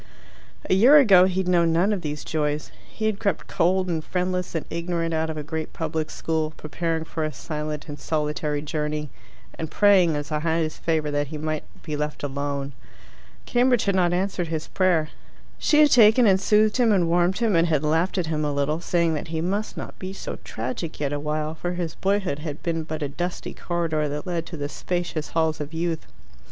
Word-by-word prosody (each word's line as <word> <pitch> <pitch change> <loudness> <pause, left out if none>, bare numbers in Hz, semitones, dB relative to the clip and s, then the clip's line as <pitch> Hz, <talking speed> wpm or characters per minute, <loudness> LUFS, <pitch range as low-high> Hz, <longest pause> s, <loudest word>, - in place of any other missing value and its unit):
A - - +2
year 245 +10 +7
ago 195 -10 +7
he 190 0 0
had 185 - -4
known 170 -2 +3
none 180 +6 +3
of 195 - -2
these 150 -2 -4
joys. 150 -1 -2 0.2
He 220 - -4
had 215 -2 0
crept 200 -6 -1
cold 185 +2 +1
and 165 -3 -1
friendless 180 0 -2
and 160 - -2
ignorant 170 -1 -2
out 160 0 0
of 155 - -4
a 150 - -3
great 160 +1 -5
public 160 -1 -2
school, 160 -1 -2
preparing 165 +1 -2
for 160 0 -4
a 155 - -1
silent 150 -1 -5
and 145 -2 -7
solitary 150 0 -1
journey, 150 -1 -3 0.5
and 160 -1 -3
praying 190 -5 +4
as 145 +1 -4
a 150 - 0
highest 160 0 -1
favour 155 -2 0
that 145 0 0
he 155 +2 -6
might 155 0 -3 0.2
be 155 -2 -4
left 150 0 -3
alone. 140 0 -3 0.7
Cambridge 245 -1 +3
had 200 - +2
not 180 -2 +3
answered 180 -1 -1
his 160 -1 -4
prayer. 175 -5 +2 0.5
She 300 0 +4
had 295 - +6
taken 230 +1 +7
and 190 -2 +4
soothed 215 +2 +3
him, 240 -3 +4
and 185 -5 +3
warmed 175 +2 +2
him, 225 -5 +2
and 165 +1 +4
had 155 -3 +1
laughed 165 +5 +1
at 180 - +1
him 155 -1 -1
a 150 - 0
little, 145 +3 0
saying 170 -2 +1
that 155 +2 -3
he 160 0 -3
must 200 +6 -2
not - - -7
be 190 0 -5
so - - -6
tragic 130 +8 -5
yet 145 -1 -1
awhile, 150 +1 -2
for 175 +2 -3
his 175 -3 -3
boyhood 195 -6 0
had 150 -1 -6
been 165 -1 -1
but 155 -1 -4
a - - 0
dusty 175 +6 -4
corridor 165 -3 -1
that 150 +1 -4
led 170 -2 -2
to 170 - -7
the 145 -1 -3
spacious 170 0 -3
halls 160 -1 +1
of 150 +2 -6
youth. 165 -1 -2
165 Hz, 210 wpm, -24 LUFS, 150-180 Hz, 0.7 s, year